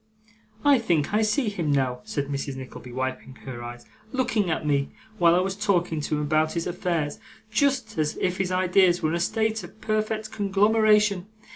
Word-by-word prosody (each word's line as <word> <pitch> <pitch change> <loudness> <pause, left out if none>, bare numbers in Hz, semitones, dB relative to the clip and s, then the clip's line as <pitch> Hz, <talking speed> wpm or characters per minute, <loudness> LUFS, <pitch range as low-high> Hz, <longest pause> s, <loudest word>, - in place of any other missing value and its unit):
I 285 -3 +6
think 170 -7 0
I 215 - +3
see 220 +4 +1
him 170 -7 -2
now!' 130 -3 +1
said 140 - -2
Mrs. 140 -1 -4
Nickleby, 130 -1 -9
wiping 130 +1 -4
her 125 -3 -6
eyes, 120 0 -8 0.3
'looking 225 -7 0
at 160 - -1
me 140 -2 +1 0.3
while 170 0 +5
I 180 - +3
was 190 +1 -2
talking 175 -6 0
to 150 - -1
him 150 - -1
about 155 +1 +1
his 170 -1 -2
affairs, 170 -4 -2 0.3
just 250 - +1
as 150 -1 0
if 185 +1 -1
his 185 -1 0
ideas 185 -1 +3
were 155 - +2
in 165 - 0
a - - -1
state 220 +4 0
of - - -12
perfect 215 0 -1
conglomeration! 210 -1 +3
180 Hz, 185 wpm, -25 LUFS, 150-215 Hz, 0.3 s, I